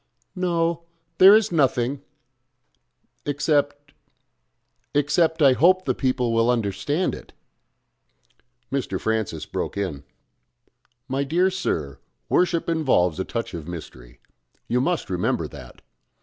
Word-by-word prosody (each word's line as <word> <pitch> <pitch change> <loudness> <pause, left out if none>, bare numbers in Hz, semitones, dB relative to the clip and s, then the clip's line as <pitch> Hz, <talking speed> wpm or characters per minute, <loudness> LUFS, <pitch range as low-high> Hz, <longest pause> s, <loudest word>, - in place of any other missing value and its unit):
"No 170 -2 -1 0.3
there 195 +3 +9
is 220 -2 +2
nothing 135 -3 +1 1.2
except... 145 0 -1 1.0
except 155 +2 +2
I 135 -2 +7
hope 185 +7 +3
the - - +1
people 130 -3 0
will 115 +1 +2
understand 120 - 0
it." - - -10 1.4
Mr. 125 -9 -2
Francis 110 -9 -2
broke - - -4
in. 90 -8 -3 1.0
"My 135 +1 -1
dear 175 +7 +1
sir, 75 - -3 0.3
worship 175 -2 +1
involves 130 - +1
a - - 0
touch 115 +3 -5
of 80 -2 -7
mystery. 65 -8 -10 0.5
You 125 +1 +1
must 175 +4 -1
remember 90 -1 -1
that. - - -13
135 Hz, 110 wpm, -23 LUFS, 100-165 Hz, 1.4 s, there